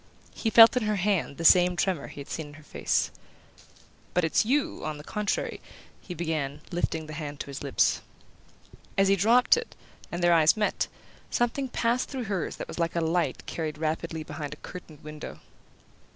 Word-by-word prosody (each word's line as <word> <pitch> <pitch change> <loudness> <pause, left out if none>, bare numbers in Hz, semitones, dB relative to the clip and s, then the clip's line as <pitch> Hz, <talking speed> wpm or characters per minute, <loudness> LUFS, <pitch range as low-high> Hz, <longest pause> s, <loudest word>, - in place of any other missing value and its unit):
He 225 - -1
felt 225 +2 +9
in 250 - +2
her 210 - +1
hand 190 -7 0
the 165 - -4
same 180 +1 +7
tremor 175 -3 0
he 145 - -9
had 140 - -10
seen 160 -2 -5
in 145 - -13
her 155 - -14
face. - - 0 1.0
"But 180 - +3
it's 160 - +3
YOU, 270 +6 0
on 155 -1 -3
the 150 - -10
contrary 210 +4 -2 0.2
" - - -27
he 180 - -7
began, 155 -4 -2
lifting 165 -2 -1
the 155 - -8
hand 145 -1 -6
to - - -6
his 135 - -6
lips. - - +2 1.0
As 195 0 +4
he 195 - +5
dropped 230 - +5
it, 470 - -5 0.4
and 175 +1 -3
their 175 0 +5
eyes 160 +3 +5
met, 210 - 0 0.4
something 240 +3 0
passed 245 +1 0
through 265 -3 -4
hers 200 -6 -2
that - - -6
was - - -7
like 165 0 0
a - - +2
light 165 +1 0
carried 155 -2 -4
rapidly 160 +1 -2
behind 150 -1 -6
a - - -29
curtained 160 -4 -10
window. 150 0 -8
170 Hz, 195 wpm, -27 LUFS, 155-210 Hz, 1.0 s, felt